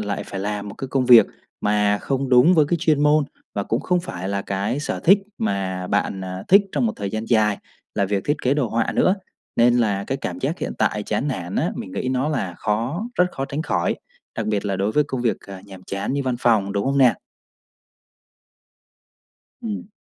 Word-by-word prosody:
lại 105 -1 -3
phải 95 - -5
làm 105 0 -3
một 100 - -8
cái 135 - -6
công 130 -1 0
việc 120 -2 +9 0.3
mà 105 0 +2
không 135 -1 -2
đúng 130 +8 +6
với 155 - +5
cái 175 - +2
chuyên 150 -2 +2
môn 150 0 +4 0.3
và 100 - -1
cũng 115 +6 -1
không 180 +3 +1
phải 95 - -6
là 100 0 -1
cái 100 +8 -2
sở - - -3
thích 195 +4 +6 0.2
mà 95 -3 -2
bạn, 100 -1 -1
à, 95 +1 -5
thích 200 +2 +7
trong 130 -5 +1
một 110 - 0
thời 100 -1 -4
gian 110 +1 -3
dài 105 -3 +3 0.4
là 100 - +1
việc 100 0 -1
thiết 145 +1 +1
kế 130 +2 +2
đồ 135 -6 0
họa 115 0 0
nữa. 185 - +3 0.4
Nên 120 +1 +5
là 100 -4 +1
cái - - -2
cảm - - -4
giác - - -2
hiện - - -3
tại 105 - +1
chán 110 +8 -1
nản 90 -8 -4
á, - - +1
mình 95 - -7
nghĩ 130 - -2
nó 130 +3 0
là 95 - -2
khó, 120 - -2
rất 180 - +4
khó 135 - -3
tránh 140 +3 -3
khỏi, - - 0 0.4
đặc 110 -2 -2
biệt 105 -2 -1
là 100 -2 -1
đối 100 +3 0
với 150 -1 +3
công 130 -3 -4
việc, 115 - +1
à, 95 -2 -10
nhàm 95 -2 -12
chán 100 +6 -3
như 140 0 0
văn 130 -2 -1
phòng, 110 -5 +2
đúng 100 0 -1
hông 140 +1 +1
nè? 125 -3 +6 2.5
Ừm. 210 -3 -5
115 Hz, 220 wpm, -22 LUFS, 100-140 Hz, 2.5 s, việc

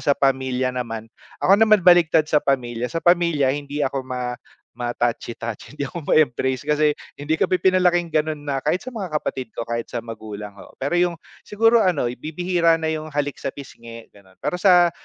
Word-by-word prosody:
sa 140 - +2
pamilya 130 -2 0
naman, 115 -3 -5 0.3
ako 195 +3 +5
naman 215 -4 +5
baliktad 170 -3 +5
sa 150 -1 +2
pamilya. 125 -4 -1
Sa 165 +4 -4
pamilya, 170 -6 +3
hindi 145 +1 -3
ako 135 0 -2
ma 125 -1 -4 0.4
ma-touchy-touchy, 120 +1 -4
hindi 140 - -1
ako 170 +4 -7
ma-embrace 130 -2 +2
kasi 150 0 +2 0.2
hindi 155 +3 -2
kami 185 - +1
pinalaking 180 -2 +3
gano'n 155 -1 -1
na, 140 -2 -2
kahit 175 +7 -1
sa 255 - -7
mga 220 -6 -5
kapatid 130 -5 -3
ko, - - -3
kahit 115 0 -3
sa 120 -2 -5
magulang. 105 -2 -8
Oo, - - -14
pero 145 +6 -1
yung 175 -1 +2 0.3
siguro 225 +3 +4
ano, 175 - +1
bibihira 170 +3 +1
na 160 -1 -1
yung 155 0 -3
halik 145 -1 -2
sa - - -5
pisngi, 115 -4 -11
gano'n. 95 -2 -21
Pero 180 - -2
sa 180 -2 +5
145 Hz, 180 wpm, -22 LUFS, 125-175 Hz, 0.4 s, ako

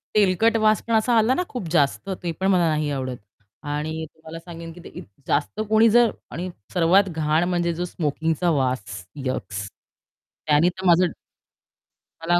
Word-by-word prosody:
तेलकट 215 +3 +3
वास 215 0 +4
पण 230 - -1
असा 225 +2 +3
आला 225 +3 +4
ना, 360 - 0
खूप 245 -10 -5
जास्त 150 +4 +1
ते 170 - -1
पण 190 +4 -2
मला 180 -3 +3
नाही 150 -1 0
आवडत 130 -2 -3 0.5
आणि 155 +2 -3
तुम्हाला 160 +1 -10
सांगेन 165 -1 -9
की 175 - -13
इत - - -9
ते 100 +8 -28
जास्त 150 +8 -1
कोणी 220 +1 +5
जर 240 +1 +5 0.2
आणि 180 +4 -4 0.2
सर्वात 185 +3 +4
घाण 155 0 +1
म्हणजे 175 -1 0
जो 175 +2 -3
स्मोकिंगचा 160 +1 -1
वास 125 - -1 0.2
यक्स 100 -6 -3 0.8
त्यांनी 150 +4 +4
तर 185 +1 -8
माझं 175 0 +5 1.2
मला 175 +1 +2
170 Hz, 165 wpm, -23 LUFS, 150-190 Hz, 1.2 s, कोणी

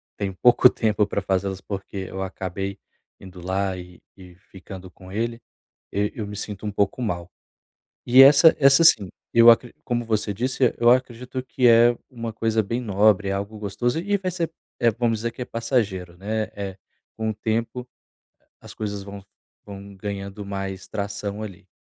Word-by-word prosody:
tenho 95 -2 -4
pouco 120 +4 +6
tempo 105 -4 0
para 100 - -2
fazer 95 0 0
elas, 95 0 -4
porque 100 0 -7
eu 95 0 -5
acabei 95 +1 -4 0.4
indo 90 -2 -12
lá 95 0 -1
e 90 -1 -11 0.2
e 90 -2 -14
ficando 95 -1 -12
com 95 +2 -14
ele 115 +3 -3 0.5
eu 105 +1 0
eu 105 -3 -5
me 105 - -7
sinto 105 0 -6
um 105 - -2
pouco 100 +5 0
mal. 90 -6 -3 0.8
E 130 +2 +8
essa, 145 +4 +8
essa 140 +2 +6
sim, 100 - +5 0.2
eu 115 0 +7
acre 115 +1 +3
como 120 -1 -1
você 110 -2 -1
disse, 125 +2 0
eu 120 0 +5
acredito 125 0 0
que 130 -1 0
é 120 +1 +6
uma 115 -2 -6
coisa 110 0 0
bem 115 +5 -3
nobre, 105 -2 +2
é 95 - 0
algo 100 +2 -4
gostoso, 105 +7 -2
e 205 +3 0
vai 185 -1 -4
ser, 170 -2 -3 0.5
vamos 115 -2 +1
dizer 115 +1 -2
que 125 - -7
é - - -2
passageiro, 105 -8 -2
né. 110 +3 -2
Eh 100 -1 -4
eh, - - -20 0.4
com 110 0 -2
o - - -4
tempo, 115 +3 -3 0.7
as - - -12
coisas 105 -2 -5
vão 100 0 -9 0.4
vão 100 -1 -10
ganhando 100 0 -6
mais 95 -1 -5
tração 100 +1 -4
ali. 95 -2 -10
105 Hz, 180 wpm, -23 LUFS, 95-120 Hz, 0.8 s, E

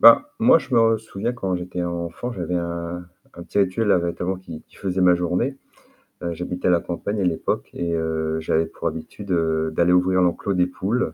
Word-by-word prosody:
Bah, 295 +1 +8
moi, 230 -6 +6
je 130 - -4
me 115 -1 +5
souviens, 110 +1 -4
quand 95 -7 -2
j'étais 90 0 -4
enfant, 85 +7 -3
j'avais 90 -4 -3
un 85 0 -3 0.3
un 85 - -8
petit 95 - -3
rituel 100 +3 +2
là, 95 - +5
notamment 90 +2 -2
qui 85 -4 -9
qui - - -21
faisait 95 -1 -1
ma 90 -1 +6
journée. 90 +10 0 0.7
Heu, 85 -1 -1
j'habitais 90 +2 -2
à - - +5
la 85 - +4
campagne 100 +4 -3
à - - +1
l'époque 85 -3 -1
et 85 -1 -2
heu, 80 -1 -1
j'avais 80 +1 +1
pour - - -4
habitude, 80 +6 -6
heu, 80 -2 +1
d'aller 85 +2 +3
ouvrir 90 +1 +4
l'enclos 90 +3 +1
des 90 0 +4
poules, 100 +7 -1
90 Hz, 205 wpm, -23 LUFS, 85-100 Hz, 0.7 s, Bah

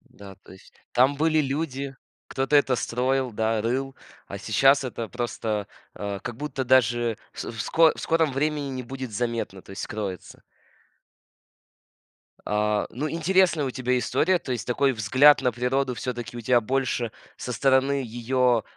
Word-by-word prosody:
Да, 100 -2 -11
то - - -15
есть 95 - -17 0.2
там 130 +3 +3
были 155 +1 +2
люди, 140 -1 -3 0.3
кто-то 135 +2 +1
это 135 -3 +3
строил, 130 +4 0
да, 110 0 0
рыл, 130 +4 -2 0.3
а 100 - -7
сейчас 135 +7 +3
это 115 -2 -5
просто, 110 -4 -3 0.3
а, 100 -1 -4
как 120 +2 -6
будто 140 -2 -4
даже 120 -3 +3 0.2
в - - -6
в 115 -2 -7
ско 160 +8 +4
в - - -9
скором 160 -3 +1
времени 145 +1 -1
не 130 -1 -4
будет 130 -1 -7
заметно, 115 -4 -3
то - - -16
есть 95 - -6
скроется. 100 -4 -6 2.0
А, 105 0 0
ну, 145 +6 -3
интересная 170 -1 +2
у - - -2
тебя 125 -1 0
история, 180 +8 +1
то 130 - -5
есть 120 -4 -4
такой 135 +2 +2
взгляд 130 +6 +5
на 125 - +2
природу 125 +2 0
всё-таки 120 -1 -5
у - - -5
тебя 120 +1 +3
больше 125 -1 -1 0.3
со 125 - -5
стороны 135 +3 +2
её, 120 0 +1
125 Hz, 160 wpm, -25 LUFS, 115-135 Hz, 2.0 s, взгляд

